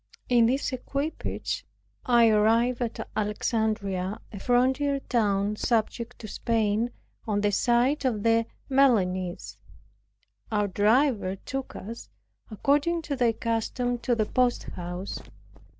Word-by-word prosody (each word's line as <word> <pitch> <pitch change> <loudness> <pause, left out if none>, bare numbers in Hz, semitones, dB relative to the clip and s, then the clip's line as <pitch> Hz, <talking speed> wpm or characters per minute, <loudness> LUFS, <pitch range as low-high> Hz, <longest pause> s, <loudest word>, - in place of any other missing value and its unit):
In 240 -2 +5
this 265 +2 0
equipage 280 +4 -3 0.4
I 235 -2 +6
arrived 230 +3 +3
at 235 -2 -3
Alexandria, 210 -2 -1
a 200 - -6
frontier 265 +5 +2
town, 205 -4 0
subject 235 +1 -1
to 220 - -8
Spain, 225 +1 0 0.4
on 205 -2 0
the 205 0 +2
side 245 +8 +2
of 225 -6 0
the 230 0 +3 0.2
Milanese. 190 -10 +1 0.9
Our 210 -1 +1
driver 210 0 +2
took 270 +7 -6
us, 230 +4 -8 0.4
according 290 - +1
to 290 -2 -3
their 240 -3 +2
custom, 235 +2 -1
to 240 0 0
the 215 -2 +1
posthouse. 190 -7 -2
230 Hz, 115 wpm, -27 LUFS, 210-250 Hz, 0.9 s, I